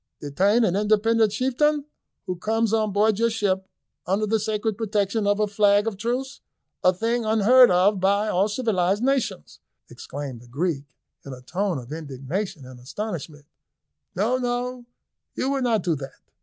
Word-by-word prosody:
Detain 195 Hz, +11 st, +2 dB
an 190 Hz, -4 st, +1 dB
independent 215 Hz, +1 st, +2 dB
chieftain, 280 Hz, +5 st, +1 dB, 0.4 s
who 185 Hz, -, -3 dB
comes 220 Hz, +4 st, 0 dB
on 215 Hz, -2 st, +1 dB
board 210 Hz, +1 st, +2 dB
your 230 Hz, 0 st, +3 dB
ship 190 Hz, -4 st, -1 dB, 0.4 s
under 195 Hz, +4 st, +1 dB
the 220 Hz, +1 st, +1 dB
sacred 215 Hz, 0 st, -1 dB
protection 205 Hz, -1 st, -1 dB
of 205 Hz, +1 st, +2 dB
a 210 Hz, -, +3 dB
flag 205 Hz, 0 st, +3 dB
of 225 Hz, -3 st, -2 dB
truce, 250 Hz, +7 st, -3 dB, 0.4 s
a 185 Hz, -, +6 dB
thing 230 Hz, +6 st, -1 dB
unheard 225 Hz, +4 st, +6 dB
of 185 Hz, +3 st, +3 dB
by 200 Hz, +3 st, +2 dB
all 195 Hz, 0 st, +2 dB
civilised 205 Hz, -3 st, 0 dB
nations," 265 Hz, -, -1 dB, 0.3 s
exclaimed 135 Hz, -4 st, -7 dB
the 120 Hz, -, -16 dB
Greek 145 Hz, +2 st, -2 dB, 0.4 s
in 135 Hz, -, -8 dB
a 125 Hz, -, -11 dB
tone 185 Hz, +4 st, -2 dB
of 125 Hz, +1 st, -9 dB
indignation 155 Hz, +3 st, -5 dB
and 130 Hz, -1 st, -12 dB
astonishment; 155 Hz, -, -6 dB, 0.7 s
"no, 220 Hz, +8 st, +1 dB
no, 245 Hz, 0 st, -3 dB, 0.5 s
you 265 Hz, -, -1 dB
will 275 Hz, -1 st, -1 dB
not 235 Hz, -4 st, +1 dB
do 175 Hz, -, +1 dB
that." 135 Hz, -1 st, -9 dB
205 Hz, 160 wpm, -24 LUFS, 180-225 Hz, 0.7 s, a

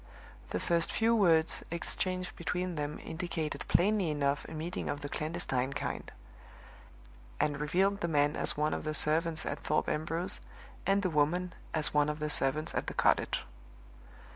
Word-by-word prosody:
The 90 Hz, -, -1 dB
first 170 Hz, -, +2 dB
few 230 Hz, +1 st, +3 dB
words 165 Hz, -6 st, +3 dB
exchanged 180 Hz, +2 st, -2 dB
between 180 Hz, 0 st, -2 dB
them 150 Hz, -1 st, -3 dB
indicated 165 Hz, -2 st, -3 dB
plainly 195 Hz, -1 st, +3 dB
enough 145 Hz, -1 st, 0 dB
a -, -, -8 dB
meeting 165 Hz, +4 st, -4 dB
of 145 Hz, -, -3 dB
the 145 Hz, -, -5 dB
clandestine 140 Hz, -4 st, -2 dB
kind; 145 Hz, -, -4 dB, 1.3 s
and 145 Hz, -1 st, +1 dB
revealed 190 Hz, +7 st, +1 dB
the 170 Hz, -, +1 dB
man 145 Hz, -2 st, +2 dB
as -, -, +1 dB
one 150 Hz, +1 st, +1 dB
of -, -, -3 dB
the 155 Hz, 0 st, -2 dB
servants 160 Hz, +1 st, +2 dB
at 140 Hz, -, -3 dB
Thorpe 155 Hz, -, 0 dB
Ambrose, 165 Hz, +4 st, -1 dB, 0.5 s
and 200 Hz, +1 st, +3 dB
the 185 Hz, -, +1 dB
woman 165 Hz, +4 st, +1 dB, 0.2 s
as 155 Hz, -2 st, 0 dB
one 150 Hz, 0 st, +3 dB
of 150 Hz, -, -2 dB
the 150 Hz, -1 st, -2 dB
servants 135 Hz, +3 st, +3 dB
at -, -, -2 dB
the -, -, -4 dB
cottage. -, -, +2 dB
160 Hz, 165 wpm, -32 LUFS, 150-180 Hz, 1.3 s, few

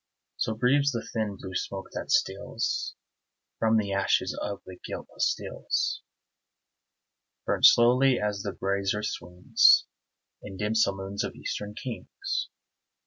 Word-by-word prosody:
(So 110 Hz, -, -1 dB
breathes 140 Hz, +5 st, +3 dB
the 115 Hz, -3 st, -4 dB
thin 110 Hz, -3 st, -2 dB
blue 95 Hz, -1 st, -8 dB
smoke, 95 Hz, +1 st, -4 dB
that -, -, -6 dB
steals 100 Hz, +4 st, 0 dB, 0.6 s
From 110 Hz, 0 st, +3 dB
ashes 100 Hz, -2 st, +1 dB
of 100 Hz, -1 st, -4 dB
the 95 Hz, -1 st, -10 dB
gilt -, -, -6 dB
pastilles, -, -, -1 dB, 1.4 s
Burnt -, -, +6 dB
slowly, 125 Hz, +2 st, +5 dB
as 105 Hz, -1 st, -1 dB
the 100 Hz, -1 st, -3 dB
brazier 100 Hz, +1 st, -1 dB
swings, 90 Hz, -3 st, +4 dB, 0.6 s
In 95 Hz, -2 st, -9 dB
dim 105 Hz, +3 st, -1 dB
saloons 100 Hz, -2 st, 0 dB
of -, -, -5 dB
eastern 105 Hz, 0 st, -5 dB
kings.) 385 Hz, -, -4 dB
105 Hz, 120 wpm, -27 LUFS, 100-115 Hz, 1.4 s, Burnt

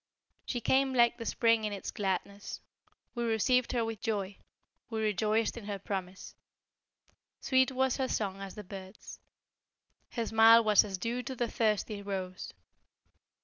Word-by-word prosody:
DIRGE -, -, -2 dB
She 245 Hz, -, -3 dB
came 265 Hz, +1 st, +2 dB
like 240 Hz, 0 st, +4 dB
the 230 Hz, -, -5 dB
Spring 230 Hz, -2 st, +2 dB
in 210 Hz, -, -1 dB
its 200 Hz, -1 st, -5 dB
gladness 200 Hz, 0 st, -3 dB, 0.5 s
We 240 Hz, -, -3 dB
received 235 Hz, +2 st, +2 dB
her 235 Hz, -2 st, +1 dB
with 225 Hz, -2 st, -5 dB
joy 205 Hz, -4 st, -2 dB, 0.5 s
we 225 Hz, -2 st, -3 dB
rejoiced 215 Hz, +2 st, +1 dB
in 225 Hz, -, -8 dB
her 205 Hz, -1 st, -3 dB
promise 190 Hz, -1 st, -6 dB, 1.1 s
Sweet 260 Hz, 0 st, +2 dB
was 265 Hz, 0 st, +1 dB
her 265 Hz, -2 st, 0 dB
song 195 Hz, -5 st, -2 dB
as 195 Hz, -1 st, -7 dB
the 210 Hz, -, -7 dB
bird's, 190 Hz, +1 st, -10 dB, 0.9 s
Her 230 Hz, -2 st, -1 dB
smile 225 Hz, +1 st, +7 dB
was 210 Hz, -2 st, +5 dB
as 195 Hz, -2 st, -4 dB
dew 235 Hz, +6 st, -2 dB
to 260 Hz, +1 st, -6 dB
the 240 Hz, -1 st, -1 dB
thirsty 215 Hz, -2 st, 0 dB
rose. 190 Hz, -2 st, -5 dB
220 Hz, 155 wpm, -31 LUFS, 200-235 Hz, 1.1 s, smile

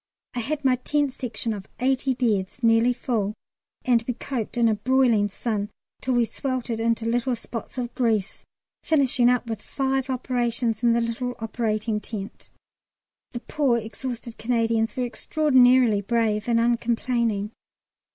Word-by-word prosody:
I 245 Hz, -, -3 dB
had 290 Hz, +4 st, -3 dB
my 255 Hz, -1 st, +4 dB
Tent 285 Hz, +1 st, 0 dB
Section 230 Hz, -3 st, -2 dB
of 200 Hz, -2 st, -8 dB
eighty 260 Hz, +1 st, +1 dB
beds 225 Hz, -2 st, -1 dB
nearly 230 Hz, +1 st, +5 dB
full, 220 Hz, -4 st, -2 dB, 0.5 s
and 240 Hz, -2 st, +3 dB
we 250 Hz, -, -1 dB
coped 240 Hz, -3 st, -4 dB
in 235 Hz, -1 st, +4 dB
a 220 Hz, -, +3 dB
broiling 230 Hz, -2 st, +2 dB
sun 210 Hz, 0 st, -3 dB, 0.3 s
till 255 Hz, -1 st, 0 dB
we 240 Hz, -1 st, +4 dB
sweltered 250 Hz, -2 st, -3 dB
into 230 Hz, 0 st, 0 dB
little 245 Hz, +2 st, +1 dB
spots 230 Hz, +2 st, -7 dB
of 245 Hz, -1 st, -3 dB
grease, 220 Hz, -5 st, 0 dB, 0.4 s
finishing 260 Hz, -5 st, +3 dB
up 250 Hz, 0 st, +2 dB
with 225 Hz, -3 st, -5 dB
five 270 Hz, +1 st, -1 dB
operations 240 Hz, -3 st, -1 dB
in 235 Hz, -1 st, +4 dB
the 235 Hz, -, +2 dB
little 240 Hz, +2 st, -2 dB
operating 220 Hz, -1 st, -1 dB
tent. 205 Hz, -2 st, -7 dB, 0.8 s
The 240 Hz, -, -5 dB
poor 275 Hz, -5 st, +1 dB
exhausted 235 Hz, +2 st, -6 dB
Canadians 230 Hz, -1 st, +1 dB
were 250 Hz, -, +1 dB
extraordinarily 255 Hz, -5 st, +4 dB
brave 215 Hz, 0 st, 0 dB
and 230 Hz, -1 st, +3 dB
uncomplaining. 235 Hz, -2 st, 0 dB
235 Hz, 145 wpm, -25 LUFS, 225-255 Hz, 0.8 s, nearly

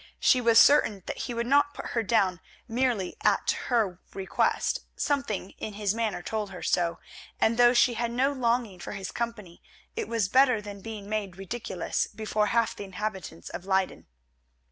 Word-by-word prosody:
She 255 Hz, -, +4 dB
was 230 Hz, -1 st, +4 dB
certain 215 Hz, -8 st, +5 dB
that -, -, -5 dB
he 240 Hz, -, -4 dB
would 235 Hz, 0 st, -1 dB
not 285 Hz, +3 st, +3 dB
put -, -, -6 dB
her 230 Hz, -, +1 dB
down 195 Hz, -5 st, +2 dB, 0.3 s
merely 235 Hz, -5 st, 0 dB
at -, -, +2 dB, 0.2 s
her 215 Hz, -8 st, +1 dB, 0.2 s
request; 190 Hz, -1 st, 0 dB, 0.2 s
something 235 Hz, -10 st, -1 dB
in 215 Hz, -, -5 dB
his 205 Hz, -1 st, 0 dB
manner 220 Hz, -5 st, -2 dB
told 215 Hz, -2 st, -3 dB
her 185 Hz, -2 st, -9 dB
so, 170 Hz, -1 st, +1 dB, 0.4 s
and 225 Hz, -, +3 dB
though 240 Hz, +1 st, +5 dB
she 240 Hz, 0 st, +5 dB
had 235 Hz, 0 st, -1 dB
no 255 Hz, +4 st, +1 dB
longing 235 Hz, -6 st, 0 dB
for -, -, -6 dB
his 195 Hz, -2 st, -5 dB
company 220 Hz, -7 st, -5 dB, 0.3 s
it 450 Hz, -2 st, -3 dB
was 225 Hz, -5 st, 0 dB
better 255 Hz, +1 st, +4 dB
than 205 Hz, -1 st, -9 dB
being 215 Hz, -1 st, -7 dB
made 205 Hz, -4 st, -3 dB
ridiculous 195 Hz, -2 st, -3 dB
before 215 Hz, 0 st, -1 dB
half 230 Hz, 0 st, +1 dB
the -, -, -7 dB
inhabitants 190 Hz, -, -5 dB
of 175 Hz, +1 st, -7 dB
Leyden. 190 Hz, -1 st, 0 dB
215 Hz, 175 wpm, -27 LUFS, 195-240 Hz, 0.4 s, certain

